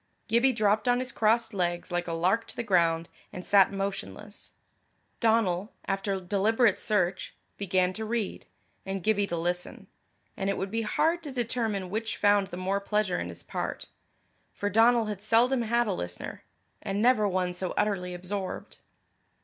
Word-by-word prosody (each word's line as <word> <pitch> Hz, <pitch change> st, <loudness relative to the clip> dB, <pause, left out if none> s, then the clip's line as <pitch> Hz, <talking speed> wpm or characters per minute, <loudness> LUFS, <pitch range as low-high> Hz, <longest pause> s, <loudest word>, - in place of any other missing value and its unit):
Gibbie 235 Hz, +4 st, +4 dB
dropped 215 Hz, -1 st, +1 dB
on 245 Hz, 0 st, +4 dB
his 255 Hz, 0 st, -3 dB
crossed 225 Hz, +1 st, +2 dB
legs 175 Hz, -2 st, -2 dB
like 175 Hz, 0 st, -1 dB
a 165 Hz, -, -2 dB
lark 185 Hz, +7 st, +1 dB
to -, -, -8 dB
the -, -, -3 dB
ground, 170 Hz, -5 st, +2 dB, 0.2 s
and 180 Hz, -, -8 dB
sat 195 Hz, -2 st, +5 dB
motionless. 200 Hz, +1 st, -6 dB, 0.7 s
Donal, 220 Hz, -4 st, +1 dB
after 195 Hz, 0 st, -1 dB
deliberate 210 Hz, +4 st, +2 dB
search, 190 Hz, -3 st, -1 dB, 0.2 s
began 185 Hz, -2 st, +1 dB
to 220 Hz, -, -5 dB
read, 220 Hz, -2 st, -3 dB, 0.4 s
and 195 Hz, -1 st, -4 dB
Gibbie 205 Hz, -1 st, +2 dB
to 170 Hz, -, -3 dB
listen; 175 Hz, +2 st, -3 dB, 0.5 s
and 195 Hz, -, -2 dB
it 195 Hz, -, 0 dB
would 190 Hz, 0 st, -3 dB
be 225 Hz, +1 st, 0 dB
hard 325 Hz, +10 st, +1 dB
to 300 Hz, -4 st, -7 dB
determine 225 Hz, -6 st, -2 dB
which 220 Hz, +1 st, -2 dB
found 205 Hz, -1 st, +3 dB
the 175 Hz, -, -8 dB
more 190 Hz, +2 st, 0 dB
pleasure 205 Hz, -1 st, 0 dB
in 85 Hz, -, -4 dB
his 85 Hz, 0 st, -10 dB
part. -, -, -4 dB, 0.7 s
For 205 Hz, 0 st, -2 dB
Donal 230 Hz, +2 st, +5 dB
had 210 Hz, -2 st, -5 dB
seldom 235 Hz, +4 st, +3 dB
had 235 Hz, +1 st, +2 dB
a 205 Hz, -, -1 dB
listener 90 Hz, -, -6 dB, 0.4 s
and 195 Hz, +1 st, -2 dB
never 225 Hz, -2 st, +4 dB
one 185 Hz, -2 st, 0 dB
so 180 Hz, 0 st, -4 dB
utterly 185 Hz, -4 st, 0 dB
absorbed. 185 Hz, +2 st, -5 dB
200 Hz, 165 wpm, -28 LUFS, 185-225 Hz, 0.7 s, sat